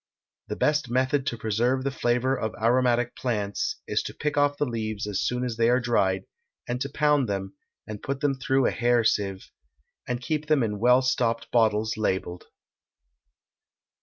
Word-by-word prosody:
The -, -, -4 dB
best 150 Hz, -3 st, +1 dB
method 130 Hz, +2 st, +1 dB
to 120 Hz, -, -1 dB
preserve 120 Hz, +4 st, 0 dB
the 140 Hz, -, -1 dB
flavor 125 Hz, +1 st, +1 dB
of 110 Hz, -4 st, -3 dB
aromatic 120 Hz, +1 st, +2 dB
plants 105 Hz, -5 st, -2 dB
is -, -, 0 dB
to -, -, -7 dB
pick 150 Hz, 0 st, -2 dB
off 145 Hz, 0 st, +2 dB
the -, -, +1 dB
leaves 110 Hz, -4 st, -3 dB
as 105 Hz, -2 st, -2 dB
soon 125 Hz, 0 st, -1 dB
as 120 Hz, -3 st, -4 dB
they 115 Hz, 0 st, +3 dB
are 125 Hz, +1 st, +4 dB
dried, 100 Hz, -6 st, +1 dB, 0.4 s
and 125 Hz, +1 st, -3 dB
to 140 Hz, -, -2 dB
pound 145 Hz, -4 st, +2 dB
them, 95 Hz, -1 st, -3 dB, 0.3 s
and 105 Hz, -1 st, -7 dB
put 140 Hz, 0 st, -3 dB
them 145 Hz, -1 st, +1 dB
through 135 Hz, 0 st, +2 dB
a -, -, +2 dB
hair 120 Hz, 0 st, +2 dB
sieve, 95 Hz, -3 st, -1 dB, 0.6 s
and 125 Hz, -1 st, -2 dB
keep 150 Hz, +3 st, -3 dB
them 150 Hz, -4 st, +3 dB
in 105 Hz, -2 st, -2 dB
well 125 Hz, +3 st, +5 dB
stopped 120 Hz, -2 st, 0 dB
bottles 110 Hz, -2 st, +2 dB
labelled. 95 Hz, -4 st, -2 dB
120 Hz, 175 wpm, -26 LUFS, 110-130 Hz, 0.6 s, well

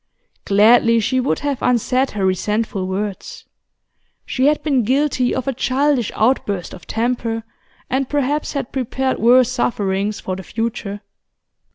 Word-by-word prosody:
Gladly 230 Hz, +3 st, +5 dB
she 255 Hz, +4 st, 0 dB
would 255 Hz, -, 0 dB
have 285 Hz, -3 st, -2 dB
unsaid 250 Hz, +2 st, +1 dB
her 195 Hz, -, +1 dB
resentful 200 Hz, +1 st, -1 dB
words; 195 Hz, +1 st, -5 dB, 0.8 s
she 260 Hz, +1 st, +1 dB
had 300 Hz, 0 st, +1 dB
been 275 Hz, -5 st, +2 dB
guilty 260 Hz, +1 st, +1 dB
of 260 Hz, -1 st, -3 dB
a 270 Hz, -, 0 dB
childish 260 Hz, 0 st, +1 dB
outburst 210 Hz, -6 st, 0 dB
of 180 Hz, -, -12 dB
temper, 230 Hz, -1 st, -1 dB, 0.4 s
and 265 Hz, 0 st, -1 dB
perhaps 290 Hz, +1 st, -1 dB
had 275 Hz, -4 st, -4 dB
prepared 260 Hz, 0 st, -2 dB
worse 250 Hz, +2 st, +5 dB
sufferings 205 Hz, -4 st, -1 dB
for 185 Hz, -, -4 dB
the 190 Hz, -, -7 dB
future. 215 Hz, -1 st, -4 dB
240 Hz, 140 wpm, -19 LUFS, 210-265 Hz, 0.8 s, Gladly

